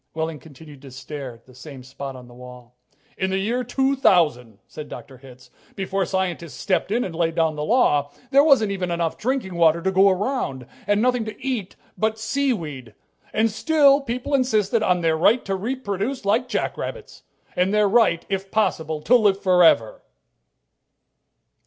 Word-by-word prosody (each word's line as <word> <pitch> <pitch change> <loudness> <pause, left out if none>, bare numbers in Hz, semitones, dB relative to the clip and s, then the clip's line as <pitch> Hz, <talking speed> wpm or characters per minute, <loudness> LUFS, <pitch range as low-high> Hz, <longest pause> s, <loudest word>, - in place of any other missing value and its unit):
Wehling 160 -1 -3
continued 145 -1 -14
to 140 - -12
stare 135 -1 -8
at 115 - -23
the 130 - -18
same 135 0 -11
spot 135 +1 -8
on 125 -1 -12
the 120 - -15
wall. 125 -1 -13 0.4
"In 190 - 0
the 190 - -1
year 230 +6 -1
2000," 180 - +1
said 150 -1 -10
Dr. 130 -2 -10
Hitz, 125 -1 -16 0.2
"before 195 -1 -2
scientists 180 -4 -3
stepped 185 -1 -1
in 240 +3 +1
and 170 - -6
laid 165 -1 -1
down 160 -2 +1
the 150 - -4
law, 150 - +2 0.2
there 280 +1 +6
wasn't 270 -9 +4
even 185 -2 -3
enough 170 -1 -1
drinking 250 -6 -2
water 170 -1 +3
to 190 +3 -1
go 190 +1 +5
around, 190 - -2 0.2
and 205 +2 +2
nothing 250 -2 +1
to 220 -1 -8
eat 250 -8 -4 0.2
but 220 0 0
sea 270 +5 -1
weed 145 - -6 0.4
and 225 +1 +1
still 285 +4 +3
people 250 +2 -4
insisted 230 -5 +1
on 180 -4 +1
their 165 -1 +2
right 210 +9 +2
to 195 - -2
reproduce 215 +2 -3
like 225 +5 +1
jackrabbits. 475 - -4 0.3
And 180 +2 +1
their 210 0 +3
right, 200 -6 +2
if 195 0 -3
possible, 160 -7 -1
to 250 - +4
live 205 -5 +3
forever." 175 - +3
190 Hz, 170 wpm, -22 LUFS, 150-225 Hz, 0.4 s, there